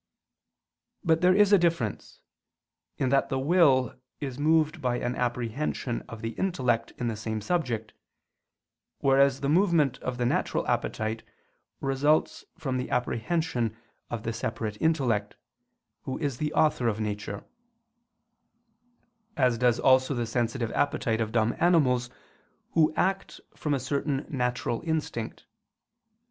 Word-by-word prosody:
But 165 -3 +2
there 180 +1 +5
is 205 0 +5
a 200 - +7
difference, 165 - -1 0.8
in 130 - 0
that 135 +1 +2
the 135 - -1
will 135 -3 +3 0.3
is 135 -3 -5
moved 155 +1 +2
by 125 -2 0
an 120 0 -2
apprehension 120 +1 -2
of 115 -1 -9
the 115 - -2
intellect 130 -11 0
in 120 - -2
the 115 - -2
same 110 0 -3
subject; 115 - -2 1.1
whereas 135 0 +4
the 140 - -1
movement 160 -5 +3
of 125 -1 -4
the 125 - 0
natural - - 0
appetite 110 +1 -1 0.6
results 140 +3 +1
from 135 -6 -2
the 125 - -3
apprehension 120 -2 -1 0.3
of 115 -3 -4
the 115 - -2
separate 110 -1 -3
Intellect, 125 -11 +1 0.7
Who 130 - -3
is 140 -5 -2
the 150 -1 -1
Author 150 -6 +2
of 110 -1 0
nature; 105 -2 -4 1.9
as 125 -4 +2
does 125 -1 +3
also 130 +1 +4
the 120 -1 -1
sensitive 115 0 -1
appetite 115 -5 0
of 110 -1 -2
dumb 110 0 +1
animals, 130 -8 +3 0.6
who 160 -2 +4
act 195 +1 -1 0.2
from 150 -2 -1
a - - -1
certain 140 +1 -2
natural 125 -3 -1
instinct. 155 -8 -3
130 Hz, 130 wpm, -27 LUFS, 115-155 Hz, 1.9 s, a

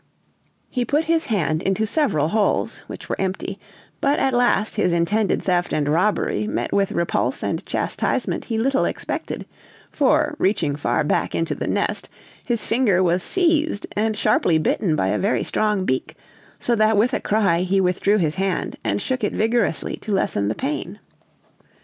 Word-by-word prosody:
He 250 - -1
put 295 +5 +1
his 325 0 +1
hand 170 - 0
into 195 +3 0
several 210 - +1
holes, 215 +1 0
which - - -8
were - - -3
empty; 190 0 -3 0.4
but 280 +1 +2
at 270 -1 +1
last 240 -3 +2
his 195 -4 +2
intended 195 +5 +1
theft 175 -1 0
and 145 -1 0
robbery 205 +6 +1
met - - -2
with 200 -1 +1
repulse 170 - -1
and - - -2
chastisement - - -1
he 225 - -2
little 270 +4 +2
expected; - - -4 0.5
for, 300 +2 +2
reaching 165 -7 +1
far 150 +2 0
back 150 - 0
into 165 - 0
the - - -4
nest, - - -1 0.4
his 235 -3 0
finger 220 -6 +2
was 175 +1 +2
seized 320 - +1
and 215 0 0
sharply 195 -6 +3
bitten 160 +2 +1
by 95 -10 0
a 105 - 0
very 205 - +1
strong 210 -3 0
beak, 130 -4 -2 0.4
so 240 - 0
that 215 -1 +3
with 235 +5 +3
a - - +1
cry 200 -6 +2
he 185 +2 +1
withdrew 190 +3 +2
his 160 -6 +1
hand, 190 +1 -2
and - - -1
shook 255 -3 -2
it 205 - 0
vigorously 225 -5 0
to 215 - -7
lessen 105 - 0
the 105 - -1
pain. 295 +3 -4
210 Hz, 170 wpm, -22 LUFS, 175-240 Hz, 0.5 s, sharply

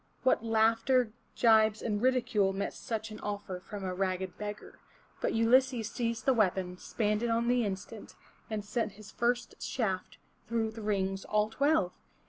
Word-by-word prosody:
What 260 -3 +3
laughter, 225 +2 +3 0.3
gibes 220 -2 +5
and 210 -3 -1
ridicule 240 -6 +2
met 195 +1 -2
such 220 -1 -4
an 215 - -8
offer 200 -3 -4
from 200 +2 -8
a 185 -1 -2
ragged 185 -1 -2
beggar! 210 0 -7 0.4
But - - 0
Ulysses 230 0 +3
seized 230 -2 -2
the 265 - +5
weapon, 185 -5 +1
spanned 210 -1 -1
it 235 - 0
on 230 +1 +1
the 245 0 +3
instant, 205 +2 -6 0.3
and 215 -2 -3
sent 220 -1 -1
his 210 +1 -12
first 240 0 -1
shaft 190 -7 -2 0.3
through 225 -1 0
the 220 0 -9
rings 195 -2 -1
all 210 +1 +1
twelve! 280 - +2
220 Hz, 160 wpm, -31 LUFS, 200-235 Hz, 0.4 s, gibes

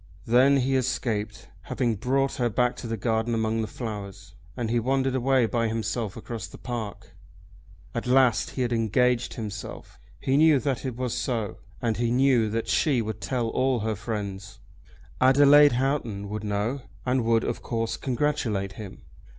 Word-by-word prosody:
Then 130 +4 +5
he 135 +1 +1
escaped, 115 -5 -2 0.2
having 120 -3 0
brought 135 +5 0
her 120 -1 +1
back 125 +3 +1
to 120 - -6
the 115 0 -3
garden 115 +2 0
among 110 0 0
the 110 - -2
flowers, 100 -5 -7 0.2
and 115 -3 -2
he 120 - +2
wandered 135 +2 0
away 130 -1 +3
by 115 0 0
himself 110 -1 -3
across 115 -4 -6
the - - -12
park. 115 -5 -6 0.8
At - - -3
last 130 -2 +3
he 130 - -2
had 120 -1 -1
engaged 120 +2 +1
himself. 105 -3 -7 0.2
He 135 +1 +1
knew 155 -1 +6
that 135 -1 -2
it 130 -3 -3
was 125 -1 -2
so, 115 -5 -2 0.3
and 115 -2 0
he 120 0 0
knew 125 -3 +3
that 115 +1 -2
she 135 -7 +2
would 110 0 -5
tell 120 -3 -1
all 130 0 +1
her 110 0 -1
friends. 100 -2 -5 0.6
Adelaide 145 +2 +7
Houghton 120 -6 -1
would 105 +1 -4
know, 105 +6 -1 0.2
and 125 -1 +1
would, 115 0 +2
of - - -3
course, 115 -1 -2
congratulate 120 -7 -1
him. 100 -1 -10
120 Hz, 165 wpm, -26 LUFS, 110-130 Hz, 0.8 s, Adelaide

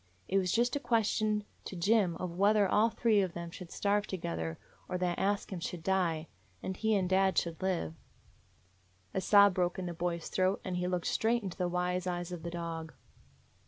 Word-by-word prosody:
It 195 - +2
was 180 -2 0
just 240 +5 +2
a - - 0
ques 235 -4 +2
tion 215 0 0 0.2
to - - -6
Jim 190 0 +2
of 175 0 -5
whether 205 +2 +4
all 215 +4 +4
three 225 -3 +3
of 185 -3 -2
them 170 -1 -6
should 180 -1 -9
starve 205 +2 0
together 80 - -3 0.3
or 180 - -1
that 180 -1 -1
Ask 200 0 0
Him 180 - -4
should 170 0 -5
die, 170 -4 +1 0.4
and 190 - -3
he 220 +2 +1
and 190 -2 +1
dad 190 +1 +3
should 170 0 0
live." 180 - -1 1.2
A 190 - 0
sob 200 0 +6
broke 180 -1 0
in 185 - -3
the 175 - -3
boy's 170 0 -2
throat, 185 +1 +1
and 185 -2 -2
he 180 0 -1
looked 180 -1 -1
straight 230 +1 +1
into 190 -3 -5
the 180 -1 +1
wise 180 +1 -1
eyes 175 0 -3
of 175 -2 -5
the 170 - -4
dog. 165 -2 -5
185 Hz, 205 wpm, -32 LUFS, 175-200 Hz, 1.2 s, sob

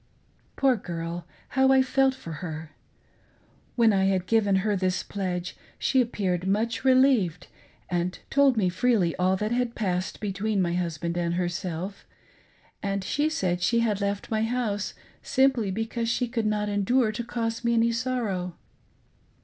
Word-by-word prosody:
Poor 270 -2 +3
girl: 170 -3 -5 0.2
how 265 0 +3
I 265 -1 +6
felt 265 0 +2
for 170 -10 -9
her! 160 -3 -6 1.0
When 230 -3 +4
I 190 -1 +3
had 190 -2 +1
givei 200 -2 +3
her 210 +1 +1
this 185 -1 0
pledge, 180 -3 -3 0.2
she 265 - +2
appeared 190 -6 -1
much 225 +4 0
relieved 255 - +3 0.4
and 180 0 -1
told 275 -3 +4
me 195 -4 +3
freely 185 -2 +2
all 185 +1 +2
that 210 +3 -2
had 245 -1 0
passed 185 -4 -2
between 205 +1 -1
my 175 -2 +1
husband 170 -1 -2
and 170 0 0
herself, 180 +2 -3 0.7
and 195 -1 -2
she 295 +10 0
said 180 - -1
she 230 +6 +2
had 210 -3 0
left 200 +2 -2
my 215 -1 +1
house 225 -4 -1 0.3
simply 260 -6 +2
because 225 +3 -2
she 245 +1 0
could 230 -2 -1
not 210 0 0
endure 215 +4 +2
to 215 +3 -4
cause 230 0 -3
me 235 0 +2
any 230 0 +3
sorrow. 230 -8 -2
205 Hz, 155 wpm, -26 LUFS, 180-235 Hz, 1.0 s, I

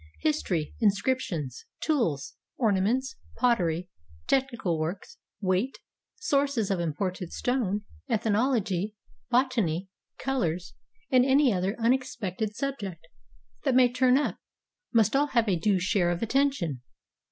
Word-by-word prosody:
History, 190 - 0
inscriptions, 200 - 0
tools, 165 - 0 0.2
ornaments, 230 +4 +1 0.2
pottery, 180 -8 +2 0.4
technical 235 -11 0
works, 165 +5 -4 0.2
weight, 190 +7 0 0.4
sources 280 - +1
of 190 - +1
imported 175 +2 -2
stone, 215 -5 -1 0.3
eth 225 -3 +1
nology, 215 -3 +1 0.3
botany, 225 -9 +1 0.3
colors, 185 -10 -1 0.4
and 255 -1 +6
any 265 -1 +4
other 190 +3 0
unexpected 225 -4 0
sub 275 +1 -2
ject 170 -5 -7 0.5
that 270 -4 +2
may 250 -1 +5
turn 255 0 +4
up, 290 - -1 0.5
must 225 0 +3
all 290 +2 +3
have 235 -5 +2
a 195 - +3
due 190 +4 +2
share 180 -1 +2
of 175 +4 -1
attention. 230 - +1
215 Hz, 120 wpm, -28 LUFS, 180-260 Hz, 0.5 s, and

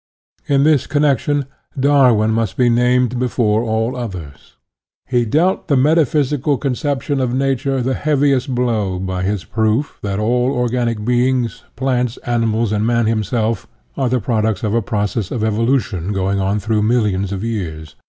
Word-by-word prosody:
In 140 -1 +3
this 145 -3 +3
connection 145 -1 +1 0.3
Darwin 130 -6 +4
must 110 -4 -1
be 125 -1 +3
named 125 0 +2
before 115 -3 +1
all 115 +2 -1
others. 90 - -8 0.5
He 125 -2 +1
dealt 165 - +1
the 145 -4 +2
metaphysical 145 -1 +2
con 135 -1 -1
ception 140 0 -2
of 125 -1 -1
Nature 135 0 0
the 130 +2 0
heaviest 140 -3 +1
blow 110 -7 0
by 95 0 -3
his 100 0 -1
proof 110 +5 -1
that 100 -1 -3
all 120 +4 +1
organic 120 -3 -1
beings, 125 -1 0
plants, 125 -2 -1
ani 120 -1 +1
mals, 110 0 0
and 105 0 0
man 115 0 +1
himself, 110 +1 -1 0.3
are 130 -2 0
the 125 +1 +1
products 110 -2 -1
of 105 -1 0
a 115 - +2
process 105 0 -2
of 115 - -3
evolution 110 -4 0
going 100 0 0
on 100 +2 0
through 105 +1 0
millions 105 -4 +1
of 100 0 -4
years. 80 -10 -5
120 Hz, 160 wpm, -18 LUFS, 105-130 Hz, 0.5 s, Darwin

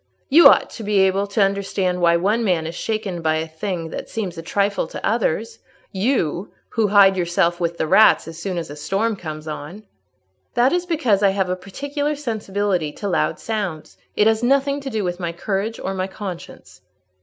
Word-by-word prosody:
"You 320 +5 +9
ought - - +4
to 225 - -8
be 205 0 0
able 190 +1 +2
to 200 +1 +2
understand 195 -2 -1
why 170 -1 +4
one 210 +7 +1
man 175 -6 +1
is 165 - -5
shaken 200 -2 -3
by 160 -1 +1
a 160 +1 -2
thing 165 +1 -4
that - - -6
seems 200 -6 -4
a 165 - -6
trifle 200 +1 0
to - - -6
others—you 225 - -2 0.2
who 225 -2 +1
hide 200 -1 +6
yourself 175 -1 +1
with 170 -1 -2
the - - 0
rats 215 +5 +5
as 165 0 -8
soon 185 0 -3
as 165 -4 -4
a - - -7
storm 195 +9 -1
comes 155 -4 -7
on." 155 +7 -7 0.7
"That 245 +4 +3
is 355 0 -1
because 255 - +1
I 200 - +5
have 190 -1 -1
a - - 0
particular 285 +10 -3
sensibility 205 - -2
to 205 - -5
loud 185 - 0
sounds; 200 -8 -4 0.2
it 210 - +3
has 220 0 +3
nothing 275 +3 +2
to 275 - -5
do 220 -4 -2
with 175 0 -3
my 170 -2 -2
courage 200 +5 -3
or 195 - -3
my 185 0 -2
conscience." 180 - -9
195 Hz, 195 wpm, -21 LUFS, 170-220 Hz, 0.7 s, You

